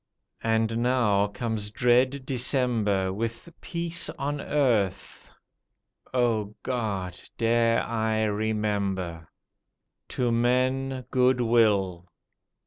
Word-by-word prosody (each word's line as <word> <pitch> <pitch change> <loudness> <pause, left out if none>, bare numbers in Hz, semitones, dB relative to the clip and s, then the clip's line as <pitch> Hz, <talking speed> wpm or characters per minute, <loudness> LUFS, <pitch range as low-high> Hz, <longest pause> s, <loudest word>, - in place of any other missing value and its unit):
And 115 0 +1
now 120 -5 +2
comes 105 0 -3
dread 130 +3 +2
December, 115 -7 +1
With 115 - -4
"Peace 170 -1 -2
on 145 +1 -2
Earth." 115 -10 -1 0.8
O 115 -4 0
God! 100 -8 -3 0.2
dare 115 0 +2
I 110 -1 0
remember? 100 -5 -2 0.8
"To 120 -2 0
men 130 +2 +1
goodwill." 115 -8 +2
115 Hz, 80 wpm, -26 LUFS, 105-125 Hz, 0.8 s, now